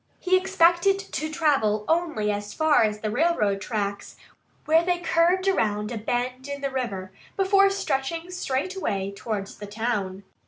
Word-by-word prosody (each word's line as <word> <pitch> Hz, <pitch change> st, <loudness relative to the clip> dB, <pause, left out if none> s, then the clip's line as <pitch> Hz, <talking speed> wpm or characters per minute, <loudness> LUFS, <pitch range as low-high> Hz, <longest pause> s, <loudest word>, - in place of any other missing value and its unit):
He 370 Hz, 0 st, +2 dB
expected 370 Hz, 0 st, +3 dB
to 390 Hz, -5 st, -4 dB
travel 270 Hz, -10 st, +1 dB
only 320 Hz, -11 st, +1 dB
as 205 Hz, 0 st, -5 dB
far 315 Hz, -1 st, +4 dB
as 210 Hz, -1 st, -1 dB
the 215 Hz, -, -2 dB
railroad 215 Hz, -10 st, +1 dB
tracks, 200 Hz, -3 st, -3 dB, 0.5 s
where 320 Hz, +2 st, +4 dB
they 355 Hz, 0 st, +1 dB
curved 350 Hz, +2 st, +2 dB
around 210 Hz, -, +1 dB
a 235 Hz, -, -3 dB
bend 250 Hz, +4 st, -2 dB
in 280 Hz, 0 st, -5 dB
the 275 Hz, -1 st, -2 dB
river 200 Hz, -8 st, -4 dB, 0.3 s
before 390 Hz, 0 st, +4 dB
stretching 335 Hz, -2 st, -2 dB
straight 360 Hz, 0 st, -2 dB
away 200 Hz, -, -2 dB
towards 205 Hz, -2 st, -5 dB
the 205 Hz, -, -7 dB
town. 205 Hz, -3 st, -3 dB
265 Hz, 155 wpm, -25 LUFS, 210-345 Hz, 0.5 s, far